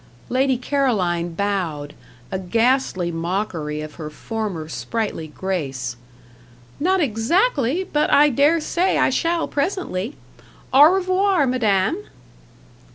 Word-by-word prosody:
Lady 260 0 +2
Caroline 200 -11 0
bowed 170 -7 -2 0.4
a 190 - -2
ghastly 225 -2 +1
mockery 165 -3 -3
of 155 -1 -8
her 150 - -5
former 200 -2 -4
sprightly 205 -2 -3
grace. 140 -8 -3 0.8
"Not 375 +5 +2
exactly; 290 - +1
but 300 -5 0
I 295 +1 +6
dare 290 +5 +3
say 355 +4 +1
I - - +3
shall 335 0 0
presently 285 - -2 0.6
au 280 +3 +9
revoir, 375 -3 +2
madame!" 245 - +1
225 Hz, 105 wpm, -21 LUFS, -, 0.8 s, au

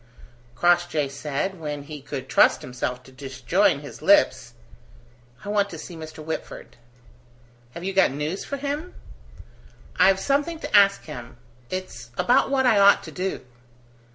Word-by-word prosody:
Crossjay 175 -2 +2
said, 150 +7 -3
when 150 -2 -5
he 150 0 -9
could 135 -1 -6
trust - - +4
himself 125 0 -4
to 130 - -16
disjoin 140 +6 0
his 145 - -11
lips: 130 - +3 0.9
"I - - -5
want 205 -1 +1
to 165 - -8
see 170 +2 -9
Mr. 155 -1 -9
Whitford." 160 - -6 1.0
"Have 170 - -7
you 195 +1 -2
got 190 - +4
news 150 +7 -4
for 280 - -5
him?" 290 +5 -4 1.0
"I've 190 +1 +5
something 290 +7 0
to - - -2
ask 200 -1 +5
him. 120 -6 -9 0.3
It's 185 -11 -6
about 245 - +3
what 270 -1 +2
I 225 -5 +5
ought 200 0 +6
to - - -9
do." 190 +1 -3
175 Hz, 150 wpm, -24 LUFS, 140-200 Hz, 1.0 s, ought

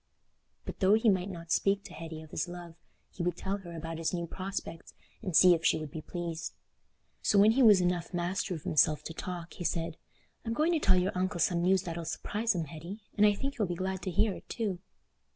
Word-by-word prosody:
But - - -7
though 195 +2 +5
he 225 0 +4
might 190 -1 +1
not 170 -3 -8
speak 200 +3 +2
to - - -11
Hetty 160 -1 -7
of 155 - -15
his - - -2
love, 175 -1 -8 0.4
he - - -7
would 175 0 -1
tell 195 +1 -2
her 175 -4 -9
about 165 0 -5
his 165 +2 -1
new 170 -1 -2
prospects 185 -2 -6 0.3
and 185 -7 -3
see 180 +1 +8
if 165 -1 -1
she - - +4
would 155 -2 -6
be 160 - -6
pleased. 170 -1 -5 0.7
So 205 - +2
when 205 +2 +7
he 260 +4 +2
was 210 -6 +7
enough 175 -1 0
master 180 +1 -1
of 155 - -8
himself 150 0 +3
to 165 - -6
talk, 175 0 -6
he - - -7
said, 165 -1 -2 0.5
"I'm 230 - -2
going 310 +8 +2
to 330 - +2
tell 190 -8 +4
your 180 +2 +1
uncle 185 0 -1
some 170 +1 +2
news 185 +1 +3
that'll 170 -2 -5
surprise 220 +6 -1
him, 170 - 0
Hetty; 170 +8 -9
and 210 0 +6
I 205 - +4
think 275 +5 -4
he'll 210 -4 +1
be 175 - -3
glad 190 +1 -3
to 185 - -3
hear 195 +4 +2
it - - -12
too." 205 -7 -2
180 Hz, 235 wpm, -30 LUFS, 165-200 Hz, 0.7 s, see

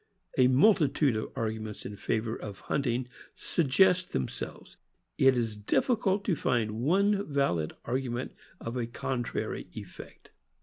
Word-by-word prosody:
A 130 - +5
mul 135 +13 +6
titude 150 - +1
of 110 - -3
arguments 110 -1 -4
in 105 - -5
favor 110 +2 -1
of 100 -2 -8
hunting 125 -2 -1 0.3
suggest 180 +4 +2
them 65 - 0
selves; - - -8 0.4
it 135 -1 +5
is 115 -3 -1
difficult 200 - +1
to 180 - +2
find 115 -6 0
one 200 +8 +3
valid 85 - +1
argument 125 0 -2 0.3
of 115 +2 -5
a 120 -2 -1
contrary 120 +1 -3
effect. - - -11
125 Hz, 135 wpm, -29 LUFS, 110-160 Hz, 0.4 s, mul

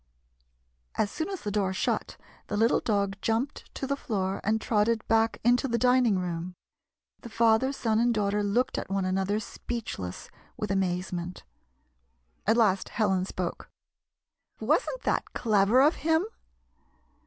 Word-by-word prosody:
As 205 - 0
soon 320 +4 -3
as 385 -2 -5
the 205 - -3
door 195 -2 0
shut, - - -2 0.3
the 205 - -2
little 225 +2 +3
dog 200 -2 0
jumped 230 +6 -2
to - - -3
the 280 +1 0
floor 195 -8 -2
and 220 +2 +1
trotted 220 +1 +1
back 225 0 +2
into 245 +3 +3
the 235 -2 0
dining 250 -3 +4
room. 180 0 -4 0.6
The 235 - -10
father, 230 +3 +3
son 225 -5 0
and 240 +1 +3
daughter 210 -2 0
looked 205 +5 0
at - - -7
one 195 -1 0
another 190 +3 0
speechless 210 - -6 0.3
with 210 -2 -3
amazement. 180 -2 -2 1.0
At 220 +2 +4
last 195 -5 +2
Helen 195 -4 +1
spoke: 185 -2 -5 0.5
" - - -50
Was - - +2
n't - - -6
that - - -1
clever 215 +2 +4
of 300 +3 +3
him 320 +4 +2
215 Hz, 150 wpm, -28 LUFS, 195-240 Hz, 1.0 s, dining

